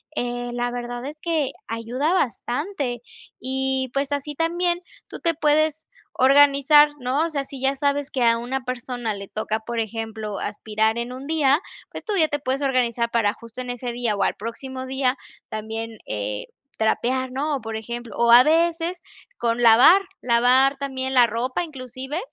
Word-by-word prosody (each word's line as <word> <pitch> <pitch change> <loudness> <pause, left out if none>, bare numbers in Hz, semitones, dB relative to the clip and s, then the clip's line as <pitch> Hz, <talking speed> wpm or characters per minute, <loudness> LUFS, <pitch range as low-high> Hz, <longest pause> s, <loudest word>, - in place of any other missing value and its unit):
eh, 245 -1 -3
la 245 0 -1
verdad 245 0 -5
es 300 +2 -8
que 320 -5 0 0.2
ayuda 240 +8 -2
bastante 275 - -2 0.4
y, 265 0 -1
pues, 275 +1 -1
así 285 +1 -2
también 345 +2 0 0.3
tú - - -9
te 335 -2 +1
puedes 310 0 +1 0.3
organizar, 285 +2 +6
¿no? 260 +5 0
O - - -2
sea, 280 -3 -3
si 270 -2 -9
ya 270 +1 +2
sabes 285 0 0
que 255 -3 0
a 230 0 +4
una 255 +3 -3
persona 245 -2 -3
le 200 -1 -8
toca, 215 0 -2
por 235 +1 -4
ejemplo, 220 -2 -4
aspirar 220 +2 -1
en 240 +1 -4
un 265 +2 -8
día, 300 0 +3 0.3
pues - - -8
tú 430 - -2
ya 320 -3 +5
te 290 - -1
puedes 270 +1 -2
organizar 240 -3 +1
para 225 -3 +2
justo 230 +2 -10
en 250 - -7
ese 245 0 -4
día 235 -3 0
o 200 - 0
al - - +1
próximo 260 +4 -6
día 265 -1 +1 0.3
también, 220 +1 -5
eh, 105 0 -3 0.3
trapear, 255 +4 0
¿no? 290 +3 -1
O, - - -11
por 225 0 -5
ejemplo 235 0 -6
o 235 0 +4
a 240 +1 +10
veces 335 +3 +1 0.4
con 235 0 0
lavar, 245 - +7 0.2
lavar 250 +3 +4
también 265 -1 -3
la 245 -2 +6
ropa 245 +8 -2
inclusive. 265 0 -6
255 Hz, 175 wpm, -23 LUFS, 235-285 Hz, 0.4 s, a